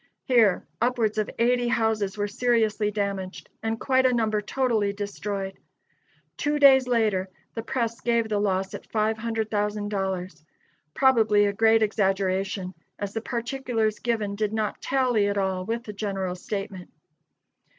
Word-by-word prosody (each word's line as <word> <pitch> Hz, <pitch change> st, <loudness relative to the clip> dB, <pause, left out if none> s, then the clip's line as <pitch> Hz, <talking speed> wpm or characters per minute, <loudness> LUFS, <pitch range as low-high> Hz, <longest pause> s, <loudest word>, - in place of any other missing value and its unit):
Here, 230 Hz, -7 st, +3 dB, 0.2 s
upwards 230 Hz, -3 st, +1 dB
of 215 Hz, -, -1 dB
eighty 245 Hz, +1 st, +2 dB
houses 220 Hz, -4 st, 0 dB
were 205 Hz, 0 st, 0 dB
seriously 220 Hz, -1 st, +1 dB
damaged, 200 Hz, -2 st, -4 dB
and 225 Hz, 0 st, -2 dB
quite 260 Hz, -1 st, +3 dB
a -, -, +2 dB
number 215 Hz, -3 st, +1 dB
totally 220 Hz, -3 st, 0 dB
destroyed. 200 Hz, -1 st, -4 dB, 0.8 s
Two 295 Hz, 0 st, 0 dB
days 265 Hz, -3 st, +6 dB
later, 215 Hz, -6 st, +1 dB, 0.2 s
the 225 Hz, -, -3 dB
press 230 Hz, -1 st, -2 dB
gave 235 Hz, -1 st, +1 dB
the 210 Hz, -2 st, 0 dB
loss 190 Hz, -1 st, 0 dB
at -, -, -9 dB
$500,000 210 Hz, -5 st, -2 dB, 0.5 s
probably 220 Hz, -6 st, +4 dB
a 200 Hz, -, 0 dB
great 225 Hz, +1 st, +4 dB
exaggeration, 195 Hz, -2 st, 0 dB, 0.2 s
as 200 Hz, 0 st, -4 dB
the 225 Hz, -, -2 dB
particulars 235 Hz, -2 st, -2 dB
given 220 Hz, -4 st, -1 dB
did 210 Hz, 0 st, -1 dB
not 215 Hz, -1 st, -2 dB
tally 250 Hz, -6 st, +2 dB
at 200 Hz, 0 st, -1 dB
all 190 Hz, -2 st, -1 dB
with 230 Hz, +1 st, -2 dB
the 210 Hz, -, -7 dB
general 195 Hz, -3 st, -3 dB
statement. 190 Hz, 0 st, -6 dB
215 Hz, 140 wpm, -25 LUFS, 200-230 Hz, 0.8 s, days